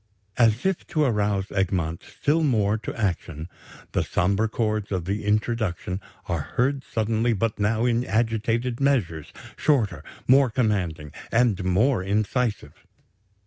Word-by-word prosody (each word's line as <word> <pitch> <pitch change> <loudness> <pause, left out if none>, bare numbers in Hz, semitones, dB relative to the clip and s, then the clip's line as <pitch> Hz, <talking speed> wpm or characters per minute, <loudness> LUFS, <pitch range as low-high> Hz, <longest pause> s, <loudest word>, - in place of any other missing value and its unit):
As 115 - +3
if 190 -2 0
to 155 - +1
arouse 105 -6 0
Egmont 90 -4 -1
still 155 +3 0
more 110 -7 +2
to 110 - -5
action, 85 -6 -2 0.4
the - - +1
sombre 100 +4 +1
chords 110 -2 -1
of 90 -4 -2
the 100 +3 -2
introduction 105 -3 -1 0.2
are 85 -4 -1
heard 135 +2 +1
suddenly, 115 +1 0
but 110 +1 -1
now 110 +3 +1
in 120 0 +2
agitated 115 +2 0
measures, 95 - 0 0.2
shorter, 130 -9 +1 0.2
more 135 0 +6
commanding, 95 - -1 0.2
and 115 -5 +2
more 100 +6 +2
incisive. 105 +4 -1
110 Hz, 130 wpm, -25 LUFS, 95-120 Hz, 0.4 s, more